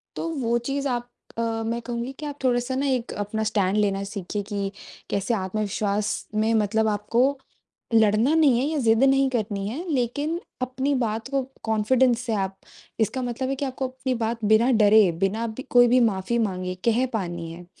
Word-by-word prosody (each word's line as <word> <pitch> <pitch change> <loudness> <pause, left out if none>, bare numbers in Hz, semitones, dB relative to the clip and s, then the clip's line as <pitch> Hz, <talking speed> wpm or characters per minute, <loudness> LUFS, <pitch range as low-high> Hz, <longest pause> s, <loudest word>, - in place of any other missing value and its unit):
तो - - -3 0.2
वो 235 +1 +2
चीज़ 280 0 -1
आप 245 -1 -2 0.3
अ, - - 0
मैं 230 0 -2
कहूँगी 240 +2 -4
कि 305 - -5
आप 290 -1 -5
थोड़ा-सा 245 0 +1
ना 275 +2 0
एक 250 -3 -1
अपना 220 +2 -2
स्टैंड 205 -2 +1
लेना 200 -2 +1
सीखिए 200 0 -4
कि, 200 -1 -3 0.4
कैसे 200 +4 0
आत्मविश्वास 205 +1 -1
में 220 +1 +2
मतलब 220 0 +2
आपको 235 +6 +1 0.6
लड़ना 220 +6 +4
नहीं 285 -7 +4
है - - 0
या 310 0 -1
ज़िद 225 -2 +3
नहीं 270 0 +4
करनी 210 -5 -2
है, 290 - -5
लेकिन 285 +6 -1 0.2
अपनी 265 +3 -1
बात 220 +2 -3
को 275 -1 +1 0.2
कॉन्फिडेंस 230 +3 +3
से 235 -3 -2
आप 195 -1 -2 0.4
इसका 255 +4 0
मतलब 245 +2 -3
है 275 - 0
कि 280 - -2
आपको 260 -1 -3
अपनी 260 0 -3
बात 225 -1 -3
बिना 220 +4 +4
डरे, 205 -2 +6
बिना 195 +7 -1
ब 225 +4 -7
कोई 245 0 +6
भी 250 +2 +4
माफी 220 0 +1
माँगे 185 -4 -1
कह 235 +2 +3
पानी 175 -5 -3
है। 175 +1 -11
230 Hz, 185 wpm, -24 LUFS, 210-255 Hz, 0.6 s, डरे